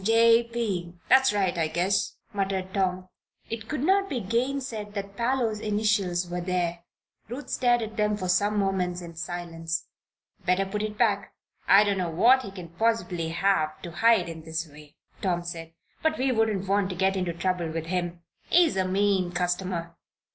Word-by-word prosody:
"'J. 230 Hz, +2 st, +5 dB
P.' 190 Hz, -7 st, -2 dB
that's 265 Hz, 0 st, +6 dB
right, 195 Hz, -4 st, +1 dB
I 160 Hz, -, +2 dB
guess," 185 Hz, +5 st, 0 dB, 0.2 s
muttered 190 Hz, -1 st, -2 dB
Tom. 185 Hz, -2 st, 0 dB, 0.4 s
It 225 Hz, -1 st, -5 dB
could 300 Hz, -3 st, -2 dB
not 390 Hz, +3 st, +3 dB
be 260 Hz, -, -1 dB
gainsaid 230 Hz, -1 st, -2 dB
that 200 Hz, 0 st, -5 dB
Parloe's 235 Hz, -2 st, 0 dB
initials 205 Hz, -4 st, +1 dB
were 175 Hz, 0 st, -3 dB
there. 175 Hz, -1 st, -1 dB, 0.5 s
Ruth 260 Hz, +5 st, -7 dB
stared 240 Hz, -2 st, +2 dB
at 220 Hz, +1 st, -7 dB
them 210 Hz, -1 st, +1 dB
for 185 Hz, -3 st, -3 dB
some 205 Hz, +3 st, +2 dB
moments 180 Hz, -3 st, 0 dB
in 170 Hz, -1 st, -9 dB
silence. 165 Hz, -1 st, -4 dB, 0.6 s
"Better 180 Hz, +2 st, +2 dB
put 205 Hz, +2 st, -3 dB
it 215 Hz, 0 st, -4 dB
back. 205 Hz, -4 st, +1 dB, 0.3 s
I 200 Hz, +2 st, +8 dB
don't 200 Hz, -2 st, 0 dB
know 180 Hz, -2 st, -1 dB
what 240 Hz, +11 st, +5 dB
he 200 Hz, -, -7 dB
can 180 Hz, -3 st, -9 dB
possibly 175 Hz, -4 st, 0 dB
have 165 Hz, -3 st, +1 dB
to 175 Hz, -, -6 dB
hide 230 Hz, +5 st, +3 dB
in 165 Hz, -1 st, -7 dB
this 160 Hz, +1 st, -4 dB
way," 150 Hz, 0 st, -15 dB, 0.3 s
Tom 175 Hz, -3 st, 0 dB
said. 165 Hz, -2 st, -6 dB, 0.3 s
"But 315 Hz, 0 st, +1 dB
we 260 Hz, +1 st, +1 dB
wouldn't 220 Hz, -5 st, +1 dB
want 200 Hz, 0 st, +2 dB
to 185 Hz, -, -4 dB
get 190 Hz, +2 st, +2 dB
into 180 Hz, -2 st, -1 dB
trouble 175 Hz, -1 st, -1 dB
with 160 Hz, 0 st, -4 dB
him. 175 Hz, 0 st, -3 dB, 0.3 s
He's 340 Hz, -, +4 dB
a 185 Hz, -1 st, +1 dB
mean 190 Hz, -1 st, +1 dB
customer." 180 Hz, -1 st, -2 dB
195 Hz, 175 wpm, -27 LUFS, 175-220 Hz, 0.6 s, I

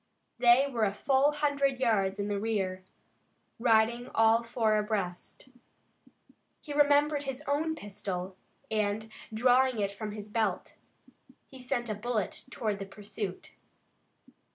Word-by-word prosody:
They 245 Hz, +2 st, +6 dB
were 235 Hz, -5 st, 0 dB
a 200 Hz, -1 st, -1 dB
full 270 Hz, +4 st, +3 dB
hundred 280 Hz, -3 st, 0 dB
yards 205 Hz, -6 st, +1 dB
in 200 Hz, 0 st, -2 dB
the 205 Hz, -1 st, -1 dB
rear, 195 Hz, -4 st, -2 dB, 0.8 s
riding 235 Hz, +1 st, +2 dB
all 225 Hz, +1 st, +5 dB
four 230 Hz, -2 st, +1 dB
abreast. 210 Hz, +1 st, -4 dB, 1.1 s
He 295 Hz, -, -8 dB
remembered 290 Hz, 0 st, +4 dB
his 270 Hz, +1 st, -5 dB
own 310 Hz, +3 st, 0 dB
pistol, 195 Hz, -, -5 dB, 0.4 s
and, 215 Hz, 0 st, -1 dB, 0.2 s
drawing 250 Hz, +2 st, +3 dB
it 200 Hz, -1 st, 0 dB
from 210 Hz, +1 st, -6 dB
his 210 Hz, -1 st, -7 dB
belt, 210 Hz, -3 st, -2 dB, 0.8 s
he 265 Hz, -, -11 dB
sent 250 Hz, -1 st, -2 dB
a 215 Hz, -, -1 dB
bullet 215 Hz, -1 st, -2 dB
toward 215 Hz, -5 st, -2 dB
the 195 Hz, -, -5 dB
pursuit. 200 Hz, -1 st, -6 dB
225 Hz, 130 wpm, -30 LUFS, 205-260 Hz, 1.1 s, They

